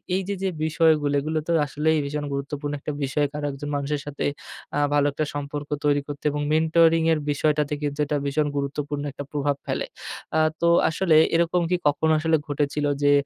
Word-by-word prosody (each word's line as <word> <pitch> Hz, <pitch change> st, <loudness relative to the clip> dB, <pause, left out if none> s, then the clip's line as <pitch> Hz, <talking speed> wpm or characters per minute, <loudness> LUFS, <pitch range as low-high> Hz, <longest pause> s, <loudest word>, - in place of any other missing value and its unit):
এই 190 Hz, -, +1 dB
যে 200 Hz, -, -1 dB
যে 190 Hz, -, +1 dB, 0.2 s
বিষয়গুলো 155 Hz, -2 st, +3 dB
এগুলো 155 Hz, +2 st, -2 dB
তো 170 Hz, -, 0 dB
আসলেই 155 Hz, +3 st, +1 dB
ভীষণ 145 Hz, +1 st, -3 dB
গুরুত্বপূর্ণ 145 Hz, +1 st, -4 dB
একটা 150 Hz, -, -4 dB
বিষয় 145 Hz, +2 st, +1 dB, 0.3 s
একজন 140 Hz, +2 st, -6 dB
মানুষের 145 Hz, +1 st, -2 dB
সাথে 145 Hz, -1 st, -5 dB, 0.5 s
আ -, -, +2 dB
ভালো 145 Hz, -1 st, +3 dB
একটা 155 Hz, +2 st, -2 dB
সম্পর্ক 145 Hz, 0 st, -5 dB, 0.2 s
তৈরি 145 Hz, -1 st, +3 dB
করতে 145 Hz, -1 st, -7 dB
এবং 145 Hz, -, -2 dB
মেন্টরিং 165 Hz, +1 st, +4 dB
এর 155 Hz, -, 0 dB
বিষয়টাতে 150 Hz, 0 st, +1 dB
কিন্তু 145 Hz, 0 st, -3 dB
এটা 150 Hz, -, 0 dB
ভীষণ 145 Hz, +2 st, +1 dB
গুরুত্বপূর্ণ 145 Hz, +1 st, -3 dB
একটা 140 Hz, +1 st, -7 dB
প্রভাব 145 Hz, -1 st, 0 dB
ফেলে। -, -, -1 dB, 0.5 s
আ -, -, +4 dB, 0.2 s
তো 170 Hz, -, +3 dB, 0.2 s
আসলে 165 Hz, 0 st, +2 dB, 0.2 s
এরকম 170 Hz, +1 st, +2 dB
কি 180 Hz, -, +3 dB
কখনো 160 Hz, +2 st, +2 dB
আসলে 160 Hz, +1 st, +2 dB
ঘটেছিল 145 Hz, 0 st, -1 dB, 0.2 s
যে 145 Hz, -, +5 dB
150 Hz, 180 wpm, -24 LUFS, 145-160 Hz, 0.5 s, যে